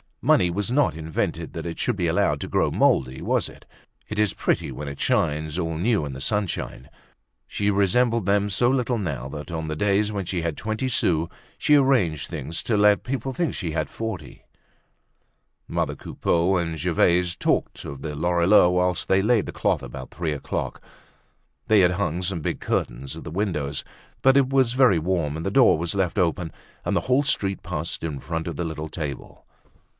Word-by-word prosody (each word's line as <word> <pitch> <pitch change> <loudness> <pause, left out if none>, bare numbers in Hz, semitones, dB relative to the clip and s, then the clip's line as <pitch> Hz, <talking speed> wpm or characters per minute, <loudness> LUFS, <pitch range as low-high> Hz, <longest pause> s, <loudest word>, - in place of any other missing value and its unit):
Money 90 - +4
was 100 +5 -2
not 140 - +2
invented 80 -1 -3
that - - -5
it 85 -1 -5
should - - 0
be - - 0
allowed - - +1
to - - -5
grow - - +1
moldy, 65 0 +2
was - - 0
it? - - -16 0.4
It 110 - -5
is 105 -2 +2
pretty - - 0
when 75 - -6
it 70 0 -7
shines 75 +1 0
all 80 -2 -2
new 100 -2 +1
in 70 - -5
the 65 - -7
sunshine. 85 - -2 0.6
She 105 0 0
resembled 115 +3 +2
them 100 +1 +2
so 110 +5 +2
little 125 -2 +1
now, 70 -10 -3
that 75 +5 -7
on 80 -1 -3
the 75 - -3
days 105 +4 +2
when 100 -3 -3
she 90 -1 -2
had 80 -2 -2
twenty 110 +4 -2
sous 85 -9 +1 0.3
she 150 - +4
arranged 125 - +2
things 80 +1 -5
to 110 - +1
let 105 0 +4
people 130 +1 -3
think 165 +5 0
that - - -6
she 85 - -3
had 80 - -2
forty. 110 -10 -6 1.2
Mother - - -1
Coupeau 85 +3 0
and 80 -2 -2
Gervaise 90 +1 +2
talked - - -1
of 70 -1 -7
the 75 -2 -4
Lorilleuxs 85 +3 +4
whilst 90 0 0
they 95 0 +3
laid 110 -1 +2
the - - -4
cloth - - 0
about 65 +2 -8
three 80 -1 -2
o'clock. 70 - -4 0.9
They 110 -2 +5
had 90 0 +4
hung 90 -2 -1
some 90 -2 -2
big - - -2
curtains 65 +3 -2
at - - -9
the - - -7
windows; 85 -7 -2 0.4
but 135 0 +5
as 140 - +7
it 130 - -2
was 130 -3 +3
very 125 -9 +5
warm 80 -3 -1
the 95 - -2
door 120 -8 +5
was 85 +3 -3
left 95 -3 0
open 85 -1 0 0.3
and - - 0
the - - +2
whole 130 +3 +2
street 100 -9 -1
passed - - -4
in 75 -4 -3
front 80 +2 -4
of 85 - -4
the 85 - -2
little 80 -1 -5
table. 75 -5 -6
90 Hz, 195 wpm, -24 LUFS, 80-105 Hz, 1.2 s, as